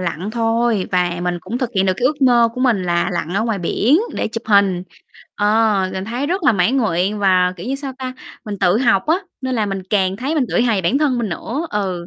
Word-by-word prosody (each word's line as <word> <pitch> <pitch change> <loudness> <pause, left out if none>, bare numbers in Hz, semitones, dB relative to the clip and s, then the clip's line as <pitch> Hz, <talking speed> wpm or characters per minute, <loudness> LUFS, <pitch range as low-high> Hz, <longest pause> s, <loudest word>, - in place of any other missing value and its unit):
lặn 180 +2 -3
thôi. 225 -3 0
Và 175 -1 +1
mình 175 0 -1
cũng 235 +8 -5
thực 250 -2 -2
hiện 190 0 +2
được 185 - +3
cái 245 - +1
ước 290 0 -1
mơ 240 -3 +5
của 250 - -5
mình 240 -7 +2
là 175 -1 0
lặn 175 +1 -3
ở 210 - +1
ngoài 225 -3 -1
biển 225 - +2 0.2
để - - -2
chụp 230 0 -5
hình. 200 -4 +3 0.5
Ờ, 210 -2 +2
mình 190 0 -4
thấy 240 +6 -3
rất 365 +4 -1
là - - +4
mãn 200 +6 +1
nguyện. 205 -3 0
Và, 185 -2 +3
kiểu 175 - -8
như 265 - -1
sao 275 -1 -5
ta, 260 -1 -4 0.3
mình 205 -3 -5
tự 180 +5 +3
học 235 -7 +2
á, 320 - +3 0.2
nên 260 -1 -2
là 220 -3 0
mình 195 -1 -4
càng 190 -2 +1
thấy 270 +8 -2
mình 290 - +2
tự - - +1
hào 235 -2 +2
về - - 0
bản 205 +11 +2
thân 285 -5 +1
mình 230 -3 -1
nữa. 250 - -4
Ừ, 185 -4 -3
215 Hz, 255 wpm, -19 LUFS, 185-250 Hz, 0.5 s, mơ